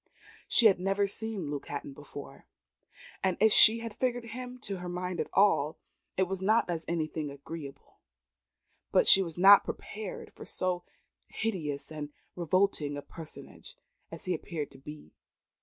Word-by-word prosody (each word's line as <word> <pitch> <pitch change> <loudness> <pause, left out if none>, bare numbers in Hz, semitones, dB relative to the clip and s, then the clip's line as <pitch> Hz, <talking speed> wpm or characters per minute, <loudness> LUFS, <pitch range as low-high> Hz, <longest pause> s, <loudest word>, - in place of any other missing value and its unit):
She 235 - +5
had 195 -4 +6
never 195 +2 +1
seen 200 -6 -2
Luke 145 -1 -5
Hatton 140 -1 -5
before; 140 -1 -11 0.8
and 190 -2 +1
if 220 +2 +5
she 225 +1 +7
had 230 -2 -6
figured 245 -2 -1
him 250 +2 -7
to 200 -7 -4
her 180 0 -6
mind 180 0 -3
at - - -2
all, 165 -6 +3 0.4
it 190 - +4
was 190 0 -3
not 215 +4 +3
as 165 -1 -3
anything 155 -2 -2
agreeable; 140 0 -10 0.9
but - - +4
she 195 - +8
was 170 -3 -4
not 195 +3 +8
prepared 210 -2 -7
for - - -11
so 180 -1 -2 0.4
hideous 160 -11 -3
and 150 -2 -5 0.3
revolting 170 -4 +1
a 145 - -6
personage 160 -2 -11 0.4
as 165 - -8
he 185 - 0
appeared 155 -2 -5
to 135 - -15
be. 150 - -11
180 Hz, 155 wpm, -30 LUFS, 150-200 Hz, 0.9 s, she